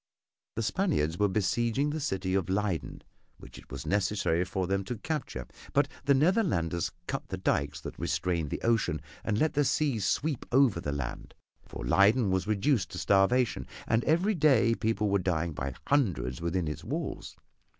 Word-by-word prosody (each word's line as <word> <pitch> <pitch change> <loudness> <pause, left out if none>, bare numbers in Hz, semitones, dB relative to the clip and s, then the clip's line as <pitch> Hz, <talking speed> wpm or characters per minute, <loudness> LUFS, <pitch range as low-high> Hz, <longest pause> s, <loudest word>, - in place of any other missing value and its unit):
The 115 - -1
Spaniards 105 - 0
were 105 - +4
besieging 115 +8 0
the 155 - -3
city 95 -9 -2
of 95 -2 0
Leyden, 95 -3 -2 0.3
which - - -12
it - - -17
was 70 +2 -7
necessary 95 -2 +1
for 90 +1 -2
them 95 +2 0
to 120 +4 -4
capture, 110 - -4 0.3
but - - +3 0.2
the 140 - +5
Netherlanders 130 - +1
cut 135 - -4
the 95 - -4
dykes 70 -6 -1
that - - -8
restrained 80 +1 -1
the - - -4
ocean 115 -9 +1 0.2
and 105 - 0
let 155 +6 +2
the 145 - +3
sea 140 -3 +1
sweep 140 +7 0
over 125 -9 +4
the 70 - -3
land, 70 -3 -5 0.3
for - - -7
Leyden 100 - +4
was 95 +2 0
reduced 110 0 +1
to - - -5
starvation, 105 +6 +2 0.2
and 110 +2 +2
every 175 +7 +3
day 135 - +4
people 110 -2 0
were 100 0 +2
dying 85 -2 -1
by 70 -2 -4
hundreds 90 - 0
within 85 0 -1
its 75 - -5
walls. - - -4
100 Hz, 170 wpm, -29 LUFS, 85-130 Hz, 0.3 s, the